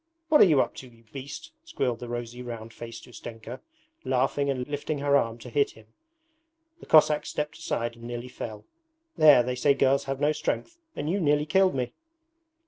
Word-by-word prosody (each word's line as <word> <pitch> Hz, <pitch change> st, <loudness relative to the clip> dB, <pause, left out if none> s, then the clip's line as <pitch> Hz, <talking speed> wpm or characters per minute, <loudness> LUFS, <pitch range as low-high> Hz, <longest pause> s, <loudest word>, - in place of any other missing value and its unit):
'What 305 Hz, -, +6 dB
are -, -, +10 dB
you 155 Hz, -7 st, +4 dB
up -, -, -2 dB
to, 130 Hz, -, -9 dB
you 115 Hz, -1 st, -20 dB
beast?' 140 Hz, -, -8 dB
squealed 130 Hz, -, -2 dB
the 120 Hz, -, -7 dB
rosy, 120 Hz, 0 st, -5 dB
round 115 Hz, -2 st, -7 dB
faced 115 Hz, 0 st, -9 dB
Ustenka, 120 Hz, 0 st, -9 dB, 0.4 s
laughing 135 Hz, +2 st, +1 dB
and 130 Hz, -2 st, -2 dB
lifting 145 Hz, +1 st, -3 dB
her 140 Hz, 0 st, +2 dB
arm 115 Hz, -4 st, +1 dB
to 120 Hz, +1 st, -10 dB
hit 140 Hz, +3 st, +1 dB
him. 110 Hz, -, -16 dB, 0.9 s
The -, -, -14 dB
Cossack 155 Hz, -1 st, +5 dB
stepped 150 Hz, +1 st, -4 dB
aside 120 Hz, -7 st, -2 dB
and 115 Hz, 0 st, -12 dB
nearly 120 Hz, +1 st, -5 dB
fell. 110 Hz, -4 st, -8 dB, 0.5 s
'There, 150 Hz, -5 st, +7 dB
they 125 Hz, +1 st, -2 dB
say 140 Hz, +3 st, +3 dB
girls 135 Hz, 0 st, +2 dB
have 135 Hz, 0 st, -3 dB
no 150 Hz, +1 st, +3 dB
strength, 335 Hz, -, -3 dB, 0.2 s
and -, -, -4 dB
you 190 Hz, +5 st, 0 dB
nearly 150 Hz, -3 st, +2 dB
killed 185 Hz, +2 st, +3 dB
me.' 125 Hz, -2 st, -2 dB
135 Hz, 190 wpm, -27 LUFS, 120-150 Hz, 0.9 s, are